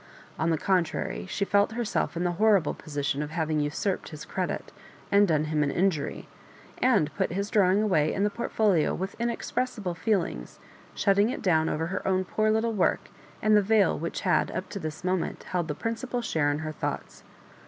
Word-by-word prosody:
On 160 - +1
the 165 - +2
contrary, 180 0 -1
she 200 - -1
felt 205 +2 +2
herself 230 -6 -1
in 175 - -1
the 175 - +1
horrible 200 -8 +4
position 145 -2 -3
of 150 - -3
having 155 -1 -1
usurped 150 +6 -1
his 155 -2 -9
credit, 185 -2 -3 0.4
and 200 0 +5
done 155 -3 +2
him 155 0 0
an 145 - +2
injury, 175 -1 -1 0.5
and 205 - +3
put - - 0
bis 200 +4 -3
drawing 200 -1 +4
away 155 -8 +2
in 195 - -1
the 205 - +2
portfolio 205 -6 +1
with 190 +2 -4
inexpressible 235 -4 -2
feelings, 170 - -2 0.4
shutting 200 +2 +3
it - - -4
down 160 -4 +3
over 160 +1 -1
her 185 +4 -4
own 185 0 +1
poor 215 +3 +1
Utile 220 +1 +1
work 200 - +1 0.3
and 215 0 +5
the 210 - +6
veil 205 -1 +3
which 165 +2 -4
had 185 - +2
up 185 - -5
to 200 - -5
this 155 -1 -6
moment 185 -1 -1
held 175 -3 -2
the 150 - -3
principal 235 - -3
share 160 -10 +1
in 145 - 0
her 155 - -3
thoughts. 155 - -5
185 Hz, 190 wpm, -27 LUFS, 160-210 Hz, 0.5 s, the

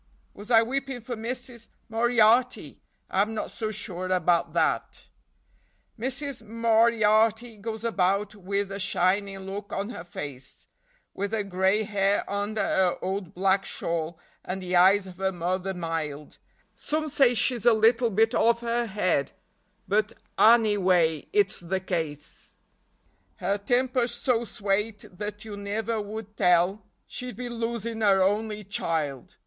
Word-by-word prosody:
Was 205 +3 -10
I 225 -2 +6
weepin' 270 +1 -3
for 240 +2 -5
Missis 235 +1 -5 0.2
Moriarty? 235 +1 +2 0.3
I'm 210 +4 +1
not 215 - -4
so 220 -2 -3
sure 185 -4 -5
about 175 -2 +1
that. - - -1 0.9
Missis 265 +2 -4
Moriarty 225 0 +2
goes 220 +1 -5
about 200 -2 +1
wid 200 0 -3
a 200 - -5
shinin' 195 +1 0
look 200 +1 -6
on 200 +2 -3
her 235 - -7
face; 145 -6 -8 0.5
Wid 200 +2 -3
her 215 -2 0
grey 190 +2 +1
hair 200 -1 0
under 205 +2 -2
her 185 -2 +2
ould 190 -2 -4
black 190 +1 +2
shawl, 165 0 -3 0.3
and 185 +1 -5
the 180 0 -1
eyes 190 +3 +5
of 185 -2 -11
her 190 0 0
mother 185 +2 -2
mild; 160 -4 -4 0.3
Some 310 +1 -2
say 270 -4 +3
she's 235 +1 +1
a - - +9
little 230 +2 +4
bit 225 +3 +2
off 235 0 +3
her 235 0 -1
head; 185 -9 0 0.5
but 210 +2 +1 0.2
annyway 190 -8 +4
it's 410 0 +2
the 180 +2 -2
case, 160 - -5 0.8
Her 200 +1 -1
timper's 245 +2 +1
so 240 -1 0
swate 205 -2 -3
that 210 +1 -5
you 210 -2 -7
nivver 210 +2 -2
would 210 0 -7
tell 180 +3 +2 0.2
she'd 250 -3 -7
be 245 0 -5
losin' 230 -1 -3
her 195 -3 +4
only 210 +2 0
child. 155 -8 -3
205 Hz, 140 wpm, -26 LUFS, 190-230 Hz, 0.9 s, a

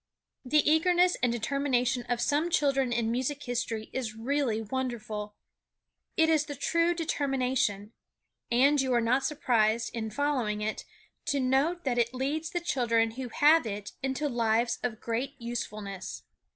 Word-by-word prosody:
The 295 +3 +2
eagerness 355 +3 +4
and 245 - +2
determination 245 0 0
of 245 -1 0
some 295 +7 +1
children 275 -6 +2
in 230 -1 0
music 260 +4 -2
history 230 -3 -3
is 235 -5 -3
really 245 -1 0
wonderful. 220 -3 -4 0.8
It 320 - +5
is 315 -2 +3
the 290 -2 -6
true 335 +5 +1
determination. 260 - -1 0.6
And 275 +4 +4
you 260 -2 +1
are - - +4
not 245 +4 +2
surprised, 230 -6 +1
in 220 -2 -3
following 250 -6 -1
it, 215 +1 -3 0.4
to 285 - 0
note 275 +7 +1
that 245 -3 0
it 235 +2 0
leads 295 +5 -2
the 350 -3 -2
children 230 -7 +1
who 250 +2 -6
have 300 +2 +4
it 205 -1 -5
into 270 +3 -1
lives 235 -1 +1
of 235 -2 -3
great 240 +5 -3
usefulness. 215 -5 -5
255 Hz, 150 wpm, -29 LUFS, 230-285 Hz, 0.8 s, It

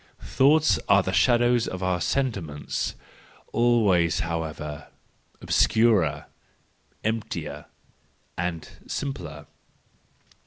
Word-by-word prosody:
—Thoughts 150 +3 +3
are 100 -1 +5
the 95 - -3
shadows 120 0 +3
of 95 0 -5
our 90 -1 0
sentiments 95 - -2 0.3
— - - -28
always, 100 -8 +3
however, 80 -3 -5 0.5
obscurer, 110 -9 +2 0.8
emptier, 110 0 -3 0.7
and 85 -2 -3 0.2
simpler. 85 - -5
95 Hz, 80 wpm, -25 LUFS, 85-120 Hz, 0.8 s, are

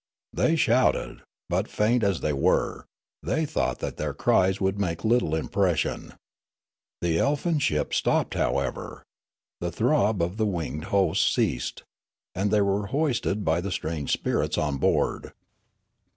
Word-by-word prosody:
They 165 - +2
shouted; 130 -4 +2 0.3
but, - - 0
faint 115 +3 +1
as 100 -4 +1
they 75 - 0
were, 70 - +1 0.4
they 160 +3 0
thought 155 - -1
that - - -4
their - - -3
cries 95 +1 +2
would 95 +1 0
make 85 -1 -2
little 110 -9 +2
impression. 90 0 -1 0.9
The 85 -1 +1
elfin 150 +3 +1
ship 75 - 0
stopped, - - +1
however; - - -2 0.6
the - - -3
throb 105 0 +2
of 90 +4 -3
the 110 -1 +1
winged 80 -6 -3
host 95 -5 +2
ceased; - - -1 0.5
and 95 +2 0
they 105 0 +3
w^ere 100 +1 0
hoisted 125 -6 -1
by 80 +2 +2
the 100 +2 -4
strange 80 -4 -3
spirits - - 0
on 75 -2 0
board. - - 0
100 Hz, 140 wpm, -26 LUFS, 85-110 Hz, 0.9 s, they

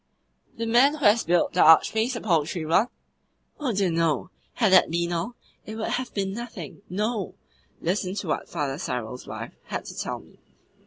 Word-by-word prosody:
"The 230 - -2
man 245 +6 +5
who 295 - -3
has 215 +3 +5
built 175 +1 +2
the 180 - +3
Archpriest 220 +10 +5
a 235 - -4
poultry 165 -3 0
run?" 175 +8 +3 0.7
"Oh 285 -5 -1
dear 195 -4 +1
no! 165 -1 0 0.2
Had 215 -5 +3
that 185 - +6
been 170 +1 -1
all, 175 +8 -3 0.3
it 215 - -7
would 220 - -3
have 255 0 -2
been 195 -1 -1
nothing. 235 -2 -7
No. 210 +1 -2 0.5
Listen 185 +2 -1
to 205 - -4
what - - -2
Father 145 -4 -2
Cyril's 125 -5 -4
wife - - -7
had - - -4
to - - -8
tell - - -3
me. - - -20
190 Hz, 180 wpm, -25 LUFS, 165-225 Hz, 0.7 s, that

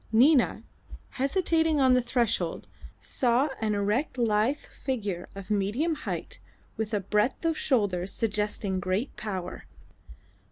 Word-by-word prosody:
Nina, 255 +4 +4 0.5
hesitating 320 +2 +1
on 260 -2 +5
the 250 - +4
threshold, 235 -8 -1 0.3
saw 250 +3 +1
an 215 -2 0
erect 210 +8 0
lithe 230 +3 +2
figure 205 -14 -4
of 195 +1 -8
medium 210 - +1
height 300 - -5 0.4
with 220 -1 -3
a - - +2
breadth 210 - 0
of 325 -1 +2
shoulder 205 - +1
suggesting 210 -2 -1
great 185 +8 -2
power. 190 -4 -5
225 Hz, 120 wpm, -28 LUFS, 200-265 Hz, 0.5 s, on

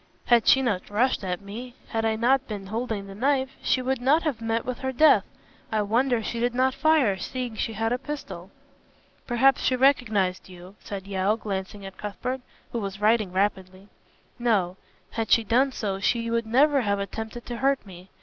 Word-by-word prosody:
Had 240 -2 +4
she 265 - +6
not 205 -7 -1
rushed 220 +2 +1
at 180 -1 -3
me, 235 +5 -8
had 225 -1 -1
I 220 0 +1
not 260 +4 +2
been 205 -3 -6
holding 220 0 -3
the 195 - -9
knife, 265 +4 +1
she 255 - +1
would 260 -1 -1
not 290 +6 +3
have 280 -8 -2
met 225 0 -1
with 255 -1 -4
her 265 - -2
death. 305 +5 +5 0.5
I 215 -1 +1
wonder 235 +2 +1
she 235 - -3
did 240 +1 0
not 260 +1 +2
fire, 300 -12 +3
seeing 250 -1 -4
she 225 - -2
had 225 +2 0
a 250 - -1
pistol." 210 -11 -7 0.8
"Perhaps 265 +2 +3
she 255 - +2
recognized 220 -9 +2
you," 180 +1 -12
said 195 -2 -7
Yeo, 195 +2 0
glancing 200 -1 -5
at 195 -1 -9
Cuthbert, 250 +6 -4 0.3
who 235 - -2
was 195 -2 -5
writing 215 -2 +2
rapidly. 190 0 -2 0.5
"No. 200 -7 +1 0.4
Had 225 -1 -3
she 230 - +5
done 255 +6 +2
so, 200 -6 -3
she 230 +3 0
would 230 -1 0
never 275 +4 +4
have 200 -3 0
attempted 220 +4 -6
to 240 - -5
hurt 270 0 +1
me. 185 -1 -13
225 Hz, 190 wpm, -25 LUFS, 200-255 Hz, 0.8 s, she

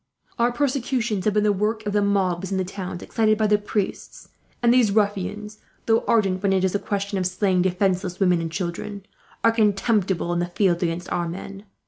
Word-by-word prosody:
Our 240 +1 +3
persecutions 245 -6 -1
have 210 -1 +1
been 210 - +3
the 210 -1 +3
work 215 +2 -1
of 205 - -2
the 205 - +3
mobs 190 -2 0
in 190 - 0
the 185 - 0
towns, 185 -1 -6
excited 215 -2 +1
by 215 - +1
the 210 0 +3
priests; 205 -1 -4 0.3
and 235 0 +5
these 245 -5 +4
ruffians, 210 0 -1 0.3
though 225 0 +2
ardent 195 -5 +2
when 200 -1 +2
it 190 -1 +1
is 190 - +1
a 205 - +1
question 200 -1 -2
of 185 - +1
slaying 185 0 +1
defenceless 185 0 0
women 180 -3 +3
and 165 -1 -4
children, 190 +3 -5 0.4
are 230 - +5
contemptible 205 -5 +1
in 175 - 0
the 175 - -1
field 175 -1 +1
against 175 0 -2
our 175 -1 -1
men. 195 +3 -8
200 Hz, 200 wpm, -23 LUFS, 185-215 Hz, 0.4 s, and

